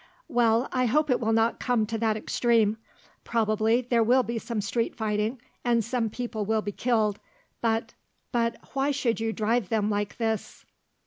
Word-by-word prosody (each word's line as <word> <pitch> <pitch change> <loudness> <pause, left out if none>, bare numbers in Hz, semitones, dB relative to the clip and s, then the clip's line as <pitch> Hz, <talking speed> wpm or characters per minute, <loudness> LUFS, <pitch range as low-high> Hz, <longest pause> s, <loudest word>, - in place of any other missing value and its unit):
"Well, 240 -3 +2
I 255 -1 +1
hope 300 +4 +2
it 250 - +3
will 225 -1 0
not 225 +1 +2
come 245 -4 +1
to 225 +1 -3
that 220 -1 +1
extreme. 225 -1 +2 0.5
Probably 220 +1 +2
there 240 -1 +1
will 250 +3 +4
be 235 -1 -3
some 225 0 -4
street 230 +3 -1
fighting 215 +2 -1 0.2
and 235 -2 +2
some 235 -1 -1
people 230 -1 -4
will 220 +1 0
be 205 - -3
killed, 215 -2 +1 0.4
but 225 -1 0 0.2
" - - -47
"But 230 -1 0 0.2
why 275 +1 +1
should 260 -5 0
you 225 0 -1
drive 220 -1 0
them 215 -1 +1
like 205 0 -2
this?" 220 -3 -3
230 Hz, 180 wpm, -27 LUFS, 220-240 Hz, 0.5 s, will